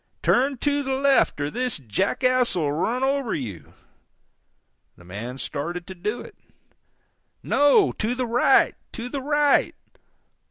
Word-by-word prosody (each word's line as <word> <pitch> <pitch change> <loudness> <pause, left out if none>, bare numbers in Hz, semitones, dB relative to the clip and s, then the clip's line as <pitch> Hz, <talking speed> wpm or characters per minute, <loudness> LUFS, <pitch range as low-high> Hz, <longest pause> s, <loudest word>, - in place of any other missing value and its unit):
Turn 270 +2 +2
to 285 +3 0
the 265 -1 -2
left, 275 - +2
or 145 0 -2
this 250 +1 -2
jackass 240 - 0
'll 155 -5 0
run 225 - -1
over 275 -3 0
you!" 105 - -7 1.2
The - - -17
man 110 +8 -7
started 170 +6 -5
to 190 - -8
do 210 +6 -4
it. 445 - -12 1.1
"No, 290 +8 +4
to 230 +3 -2
the 255 0 -2
right, 235 +1 +3 0.2
to 245 0 -6
the 275 +1 -4
right! 290 +1 +2
245 Hz, 135 wpm, -24 LUFS, -, 1.2 s, No